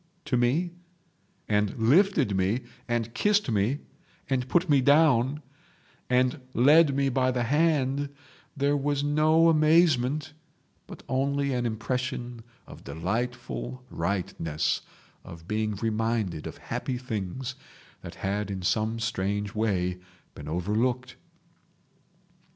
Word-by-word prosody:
to - - 0
me, 135 +9 +1 0.8
and 105 +1 +1
lifted 140 - +3
me, 95 +6 +1 0.3
and 120 -1 -1
kissed 205 - +2
me, 110 +8 0 0.5
and 130 -1 -1
put 175 +1 +2
me 145 -3 +4
down, 145 -1 +3 0.7
and 125 +3 +2
led 145 +3 +5
me 140 0 +2
by 130 -1 +1
the 125 -1 0
hand, 145 0 +1 0.5
there 140 +1 +2
was 145 0 0
no 155 +3 +4
amazement, 155 -3 +3 0.5
but - - -11
only 140 +1 0
an 120 -1 0
impression 120 +1 -3 0.2
of - - -13
delightful 120 +7 -4
rightness, 85 -3 -1 0.4
of 85 0 -12
being 110 0 -1
reminded 110 -5 -1
of - - -8
happy 130 - -4
things 125 +1 -4 0.5
that - - -9
had 100 +1 -1
in 95 -2 -4
some 110 +5 0
strange 105 -2 -2
way 90 -5 0 0.3
been 75 - -10
overlooked. 115 +9 -1
125 Hz, 115 wpm, -27 LUFS, 105-140 Hz, 0.8 s, led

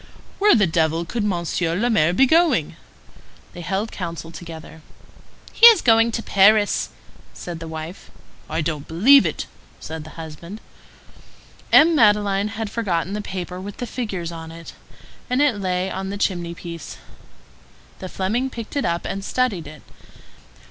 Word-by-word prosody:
"Where 415 +1 +5
the 210 - +4
devil 165 0 0
could 220 +6 -3
Monsieur 170 -3 -1
le 225 +7 0
Maire 175 -9 +3
be 230 +10 +4
going?" 330 +4 +2 0.8
They 175 - -9
held 195 +5 -3
counsel 165 -3 -6
together. 160 -1 -10 0.7
"He 470 - +9
is 455 -6 +6
going 230 0 +4
to 225 - -3
Paris," 205 +1 +3 0.5
said 175 -2 -7
the 165 - -7
wife. 160 +3 -8 0.4
"I - - -1
don't 150 -2 -4
believe 205 +7 +5
it," 155 - -4 0.3
said 160 -1 -7
the 155 - -13
husband. 165 +5 -9 1.1
M. 330 +2 +7
Madeleine 205 -4 +3
had 215 0 -5
forgotten 190 -5 -2
the 210 - -3
paper 180 -2 -6
with 200 +1 -8
the 245 - -4
figures 195 -9 -5
on 165 -1 -8
it, 165 0 -11 0.6
and 250 +1 +1
it 285 -8 +2
lay 185 0 -1
on 190 +1 -4
the 200 - -4
chimney 175 -4 -2
piece. 170 -2 -8 1.0
The 185 - -7
Fleming 220 +9 -1
picked 230 -1 -8
it 285 - 0
up 170 0 -2
and 195 0 -4
studied 205 -10 -1
it. 150 -1 -12
190 Hz, 155 wpm, -21 LUFS, 165-220 Hz, 1.1 s, He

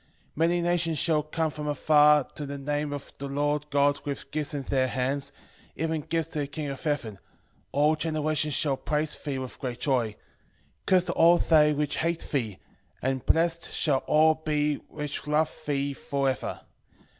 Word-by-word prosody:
13:11 - - -36 0.3
Many 170 +2 +2
nations 170 -2 +1
shall 155 +1 +3
come 155 +1 -2
from 150 0 -3
far 150 0 +5
to 145 +3 -8
the 140 0 -5
name 145 +1 -2
of 145 -1 -7
the 140 - -4
Lord 145 +1 -1
God 145 0 +2
with 140 -2 -5
gifts 150 -1 -2
in 140 - -3
their 130 -1 +1
hands, 135 +2 -1 0.4
even 160 0 -1
gifts 165 +1 -2
to 155 - -4
the 145 - -1
King 145 0 -5
of 135 -1 -6
heaven; 125 -10 -2 0.5
all 150 +3 +3
generations 155 -1 0
shall 140 -3 +1
praise 150 +1 -1
thee 140 -3 -4
with 130 -1 -7
great 125 -2 -4
joy. 130 -5 +2
13:12 105 - -10 0.7
Cursed 180 -2 +3
are - - -2
all 170 +1 +6
they 150 -3 +4
which 150 0 -1
hate 170 0 -1
thee, 115 -9 -1 0.5
and 130 0 -1
blessed 165 0 +2
shall 140 -4 +1
all 155 +1 +5
be 150 -2 0
which 150 -1 -5
love 150 +1 +1
thee 140 -1 0
for 140 0 -2
ever. 130 - -2
150 Hz, 180 wpm, -27 LUFS, 140-155 Hz, 0.7 s, all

